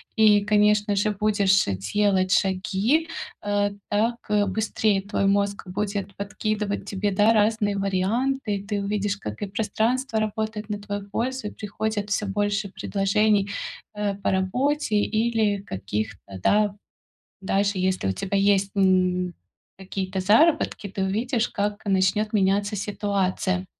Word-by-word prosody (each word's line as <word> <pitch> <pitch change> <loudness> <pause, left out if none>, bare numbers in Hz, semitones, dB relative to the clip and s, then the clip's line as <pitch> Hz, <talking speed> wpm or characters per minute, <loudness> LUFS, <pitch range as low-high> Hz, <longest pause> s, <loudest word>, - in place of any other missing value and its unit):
и, 210 -2 +5
конечно 210 0 +3
же, 210 +2 +1
будешь 200 -1 +2 0.3
делать 195 -3 +2
шаги, 200 - +1 0.3
э, 205 0 +1 0.2
так, 225 +3 +1
э, 210 -1 +3
быстрее 205 0 0
твой 200 0 -1
мозг 200 0 +1
будет 200 0 -3
подкидывать 205 0 -3
тебе, 200 +1 -1
да, 210 +3 +4
разные 210 -1 +2
варианты. 210 +5 0
И 195 - -5
ты 205 -1 -2
увидишь, 205 0 -1
как 105 - -7
и 205 - -2
пространство 225 +4 -1
работает 215 0 -3
на 205 -1 -3
твою 205 -1 -6
пользу, 250 +2 -2
и - - -6
приходит 210 0 -3
всё 205 - 0
больше 205 +1 -1
предложений, 200 +1 +1 0.5
э, 210 -1 -1
по 200 - -1
работе 245 +7 0
или 215 -1 +1
каких-то, 100 - -5
да, 205 - +2 0.7
даже 195 +1 +1
если 185 - 0
у 95 - +2
тебя 195 - -2
есть, 195 0 +3
м, 185 -2 +2 0.4
какие-то 190 0 -4
заработки, 225 - +3
ты 195 0 -3
увидишь, 225 +5 0
как 205 +1 -3
начнет 200 +2 +1
меняться 200 +1 +2
ситуация. 190 -2 -1
205 Hz, 135 wpm, -24 LUFS, 195-215 Hz, 0.7 s, и